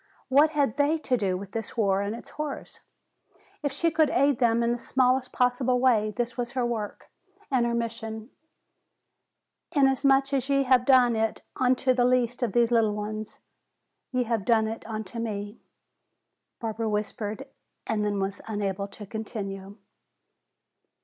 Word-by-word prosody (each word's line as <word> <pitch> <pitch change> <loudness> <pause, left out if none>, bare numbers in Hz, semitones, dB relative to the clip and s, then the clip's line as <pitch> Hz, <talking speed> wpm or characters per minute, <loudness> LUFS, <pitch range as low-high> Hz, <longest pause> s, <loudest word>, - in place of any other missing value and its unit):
What 285 +4 +5
had 280 -4 +1
they 290 +3 +3
to 275 -5 0
do 195 -5 0
with 195 0 -9
this 225 +1 -6
war 200 -3 +2
and 200 +2 -2
its 235 - -11
horrors? 300 -1 -6 0.8
If 285 -2 -1
she 335 +4 0
could 315 -2 +3
aid 280 -1 +2
them 235 -1 +3
in 235 - +2
the 240 - -1
smallest 255 +1 +1
possible 250 0 +1
way, 230 -4 +3
this 240 -1 -2
was 240 +1 -4
her 255 -2 0
work 220 -4 -4 0.4
and 245 -3 +2
her 235 - 0
mission. 225 0 -4 1.4
'Inasmuch 275 -1 +3
as 270 0 0
ye 275 0 +3
have 255 -1 +3
done 250 -3 +5
it 220 0 -1
unto 255 0 +2
the 245 -1 +2
least 245 -1 +1
of 235 -5 0
these 235 0 +3
little 220 -3 +3
ones, 215 +1 -6 0.7
ye 255 -1 +1
have 230 -3 -1
done 220 0 +3
it 225 +1 -5
unto 220 0 -5
me,'" 205 -1 -4 1.0
Barbara 225 -1 -2
whispered, 210 +4 -3 0.4
and 215 -1 -1
then 205 -1 -1
was 195 0 -3
unable 200 -2 -2
to 210 +1 -10
continue. 200 -2 -6
235 Hz, 155 wpm, -27 LUFS, 215-255 Hz, 1.4 s, What